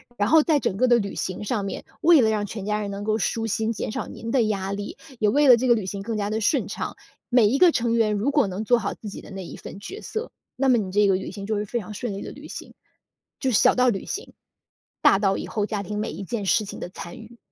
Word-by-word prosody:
然 205 -1 +1
后 320 +3 +7
在 305 0 +3
整 195 -8 -1
个 255 - +3
的 240 -1 +6
旅 200 -2 -3
行 185 +2 -3
上 210 -1 -1
面， 195 - -5 0.2
为 330 -3 +6
了 220 - +3
让 210 -1 0
全 205 -1 -6
家 210 0 0
人 205 -1 -3
能 200 +1 -5
够 215 +1 +1
舒 225 +2 -1
心， 225 +1 0
减 215 - -4
少 - - -4
您 230 - -6
的 260 - +3
压 195 -3 -1
力， 200 0 -5 0.2
也 215 - +3
为 285 +6 +4
了 245 - +9
这 255 +2 0
个 240 - +6
旅 215 -4 -3
行 195 +1 -4
更 225 +3 -3
加 205 -1 -1
地 215 +1 -1
顺 220 - +2
畅， - - -5 0.3
每 245 -3 +5
一 250 +6 +2
个 345 +1 +6
成 230 -1 +1
员 225 -2 +2
如 210 +7 0
果 285 -6 +3
能 190 +3 -4
做 240 +2 +3
好 205 - -2
自 215 - -8
己 - - -8
的 - - -12
那 190 -1 -6
一 - - -9
份 - - -9
角 390 - -7
色， 445 +2 -5 0.2
那 270 +1 +2
么 250 - +5
你 190 -4 -3
这 205 +1 +4
个 190 - +4
旅 190 - -4
行， 200 -1 -7
就 215 +1 -1
会 205 0 -2
非 230 +4 -3
常 215 -2 -5
顺 220 +1 -4
利 195 - -5
的 - - -7
旅 - - -11
行。 - - -9 0.7
就 265 - +1
是 220 - +4
小 - - +5
到 250 0 +4
旅 195 -5 -2
行， 420 - -5 0.7
大 195 - +5
到 195 -2 +2
以 - - -4
后 210 -2 -1
家 210 -2 -3
庭 210 +2 -4
每 215 - -2
一 - - -6
件 210 0 -3
事 205 +4 +3
情 205 - -8
的 - - -5
参 175 -1 -9
与。 230 +1 -13
215 Hz, 315 characters per minute, -24 LUFS, 200-240 Hz, 0.7 s, 了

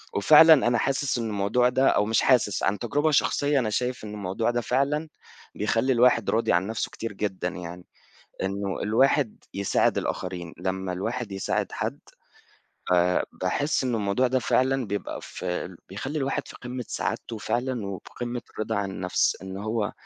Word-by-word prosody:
وفعلًا 155 +9 +8
أنا 120 - +3
حاسس 135 +2 0
إنه 115 - -2
الموضوع 105 +5 +2
ده، 130 +2 +2
أو 105 - +2
مش 110 0 +2
حاسس 120 -7 +3
عن 100 +1 +1
تجربة 145 +6 +1
شخصية، 145 0 +2
أنا 115 -4 0
شايف 125 +3 -2
إنه 105 - -7
الموضوع 105 +3 -1
ده 120 0 -1
فعلًا 140 +6 0 0.5
بيخلي 115 +5 +1
الواحد 120 -2 +4
راضي 115 +1 +2
عن 90 +3 +2
نفْسه 110 0 -2
كتير 115 -2 -5
جدًا 95 -3 -2
يعني، 90 -1 -8 0.6
إنه 100 0 -2
الواحد 120 +3 +2
يساعد 100 0 +1
الآخرين، 90 -3 -4
لمّا 95 -1 -3
الواحد 115 +3 -3
يساعد 95 - -2
حد - - -3 0.9
آآ 90 0 +3 0.2
باحس 140 +12 0
إنه 125 -3 0
الموضوع 105 +5 +1
ده 130 +1 +1
فعلًا 130 0 +1
بيبقى 105 +1 -4
في 90 0 -5
بيخلي 130 +11 -4
الواحد 135 0 -2
في - - -10
قمة 125 0 -6
سعادته 115 - -3
فعلًا 120 -1 -2
وفي 95 -2 -7
قمة 120 0 -3
الرضا 110 +1 -2
عن 100 -1 -2
النفْس، 90 -1 0
إن 95 0 -6
هو 110 0 -2
110 Hz, 165 wpm, -26 LUFS, 100-125 Hz, 0.9 s, وفعلًا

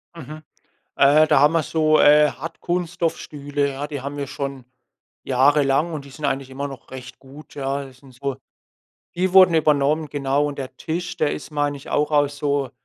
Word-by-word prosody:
Mhm. 155 0 -10 0.5
Äh, 145 +3 +5
da 150 -3 +4
haben 150 +3 +4
wir 165 - +2
so, 155 0 +2
äh, 150 0 +6
Hartkunststoffstühle, 160 -2 -3
ja, 140 +2 -5
die 145 -3 -6
haben 140 +1 -6
wir 140 -1 -4
schon 140 -2 -6 0.6
jahrelang 140 +4 +2
und 150 -3 -5
die - - -13
sind 150 +2 -6
eigentlich 135 -1 -2
immer 140 +2 -5
noch 135 -3 -12
recht 130 -1 -10
gut, 140 +4 -15
ja. 140 0 -3
Die 135 - -13
sind 130 +1 -19
so 135 +1 -4 0.8
die 185 +1 0
wurden 185 -3 +7
übernommen, 150 0 +2
genau. 140 0 0
Und 145 - -6
der 130 -1 -7
Tisch, 175 +2 -4
der 150 - +1
ist, 150 - -8
meine 145 -1 -1
ich, 140 - -12
auch 150 +1 0
aus 145 -1 +1
so 145 -2 -1
145 Hz, 185 wpm, -22 LUFS, 140-155 Hz, 0.8 s, wurden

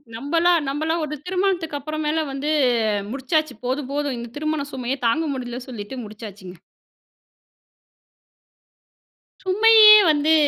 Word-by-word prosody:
நம்பலாம் 330 +6 +1
நம்பலாம் 315 +4 -2
ஒரு 300 0 -6
திருமணத்துக்கு 360 -5 -1
அப்புறமேல 310 +2 -2
வந்து 275 +2 -4 0.6
முடிச்சாச்சு. 310 +4 -1
போதும், 260 +2 -3
போதும் 285 -2 -2
இந்த 235 0 -7
திருமண 310 -1 -2
சுமையே 260 +1 -3
தாங்க 295 +8 +1
முடியலன்னு 250 -1 -7
சொல்லிட்டு 220 +1 -8
முடிச்சாச்சுங்க. 205 -3 -11 2.9
சுமையே 430 +3 +6 0.2
வந்து 300 +2 +2
295 Hz, 105 wpm, -21 LUFS, 255-320 Hz, 2.9 s, சுமையே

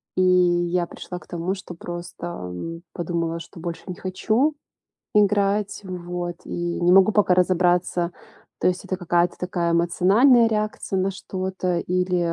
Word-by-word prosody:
и 185 - +2
я 175 -1 +3
пришла 180 - -8
к - - -19
тому, 175 +2 -2
что 190 -2 -9
просто, 175 0 -7
м, 165 - -6
подумала, 170 -1 -2
что 170 +1 -11
больше 170 -1 -5
не 180 - -5
хочу 220 +10 0 0.6
играть. 205 0 +2
Вот, 175 -2 -5
и 175 0 -3
не 175 +1 +4
могу 195 +2 +6
пока 205 -3 +3
разобраться, 180 -1 +2 0.5
то - - +2
есть 180 0 -1
это 185 - -2
какая-то 175 -1 +1
такая 175 -2 -1
эмоциональная 205 +9 +5
реакция 210 -3 -1
на 190 +1 +1
что-то 185 -1 -3
или, 180 0 0
180 Hz, 145 wpm, -23 LUFS, 175-190 Hz, 0.6 s, могу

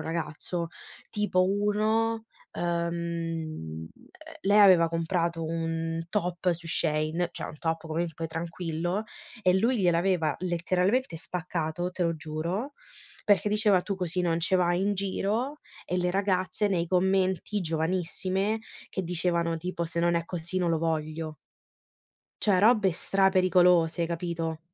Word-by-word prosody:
ragazzo. 170 +1 -3 0.4
Tipo: 210 -4 +2
uno, 215 +3 +1 0.3
uhm, - - -5 0.3
uhm, 165 - -4 0.5
lei 205 -2 +4
aveva 185 -5 +7
comprato 165 0 -1
un 165 0 -2
top 180 -2 0
su 170 0 -8
Shein, 160 +1 0
cioè - - -4
un 155 - -8
top 165 0 -1
comunque 165 0 -3
tranquillo, 170 +4 -3 0.4
e 180 - +4
lui 235 +4 +2
gliel'aveva 175 -4 +2
letteralmente 180 +4 0
spaccato, 175 0 -3
te 180 - -3
lo 165 -1 +1
giuro, 165 - -3 0.5
perché 205 0 +3
diceva: 210 -3 +3
"Tu 200 - -2
così 180 -1 -2
non 170 -1 +1
ce 185 +3 +3
vai 175 0 +2
in 205 +1 +1
giro", 210 +8 -1 0.3
e 180 - -1
le 180 0 +1
ragazze 190 +1 +1
nei 175 -4 0
commenti, 190 +2 +1
giovanissime, 185 +5 0 0.3
che 190 - -3
dicevano 170 -1 0
tipo: 175 +1 -3
"Se 170 0 -2
non 170 0 +2
è 170 0 0
così 170 +1 -4
non 180 -2 +1
lo 165 - +1
voglio". 155 -1 -2 1.1
Cioè 200 -4 +3
robe 210 -3 +5
stra-pericolose, 180 -2 +3
capito? 165 -1 -3
175 Hz, 130 wpm, -28 LUFS, 165-190 Hz, 1.1 s, aveva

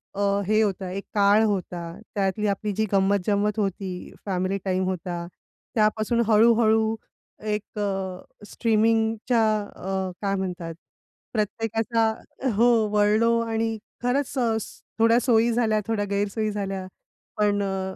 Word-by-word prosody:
अ, 200 - -2 0.3
हे 215 +1 +3
होता 195 -3 -1
एक 195 +1 -4
काळ 205 +1 +5
होता, 180 -4 -2 0.2
त्यातली 200 +1 0
आपली 205 +1 -1
जी 220 +2 0
गंमत-जंमत 200 +2 +2
होती, 190 -2 -3
फॅमिली 190 0 -1
टाईम 185 0 +1
होता. 175 -2 -3 0.5
त्यापासून 215 +2 +2
हळूहळू 220 0 +4 0.5
एक 210 0 -3
अ, 190 -2 -2 0.2
स्ट्रीमिंगच्या 225 +1 +1 0.3
अ, 190 0 -3
काय 195 -1 0
म्हणतात 180 -3 -4 0.6
प्रत्येकाचा 225 +1 0 0.5
हो 235 +3 +4 0.3
वळलो 215 +3 +3
आणि 225 -1 -1 0.3
खरंच 270 +2 0
अ, 225 -2 +2 0.4
थोड्या 230 +1 +5
सोयी 235 -1 +3
झाल्या, 220 -3 +2
थोड्या 210 -2 0
गैरसोयी 205 +2 -1
झाल्या. 195 -2 -3 0.5
पण 205 -1 +2
अ, 190 -1 -3
210 Hz, 120 wpm, -25 LUFS, 195-225 Hz, 0.6 s, काळ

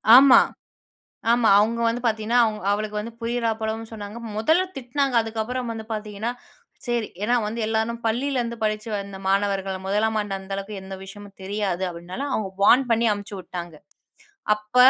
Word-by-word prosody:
ஆமா. 265 0 +9 0.9
ஆமா. 235 -1 +4
அவங்க 225 +3 +1
வந்து 235 +2 0
பாத்தீங்கனா, 220 +2 +2
அவ 220 - 0 0.2
அவளுக்கு 210 +1 -1
வந்து, 230 +2 -6
புரியிறா 230 0 0
போலவும் 220 +1 -3
சொன்னாங்க. 210 0 -7 0.2
மொதல்ல 320 +12 +3
திட்னாங்க. 270 +1 -1
அதுக்கப்புறம் 225 +3 -3
வந்து 220 -1 -7
பாத்தீங்கனா, 215 +1 -3 0.5
சேரி 240 -2 0 0.2
ஏன்னா 240 - +2
வந்து 225 +2 -4
எல்லாரும் 225 +1 -1
பள்ளியிலேருந்து 240 0 0
படுச்சு 215 +1 -1
வந்த 200 -1 -4
மாணவர்கள, 195 -1 +1
முதலாம் 220 +2 +1
ஆண்டு 205 -1 -3
அந்த 190 0 -7
அளவுக்கு 195 +1 -5
எந்த 190 0 -7
விஷயமும் 200 +1 -11
தெரியாது 190 -2 -2
அப்டினால, 175 +9 -6
அவங்க 200 -3 -1
வார்ன் 255 +6 +6
பண்ணி 230 +1 +3
அமுச்சு 205 0 -4
விட்டாங்க. 175 -2 -7 0.8
அப்ப 210 +3 -10
220 Hz, 155 wpm, -24 LUFS, 200-235 Hz, 0.9 s, ஆமா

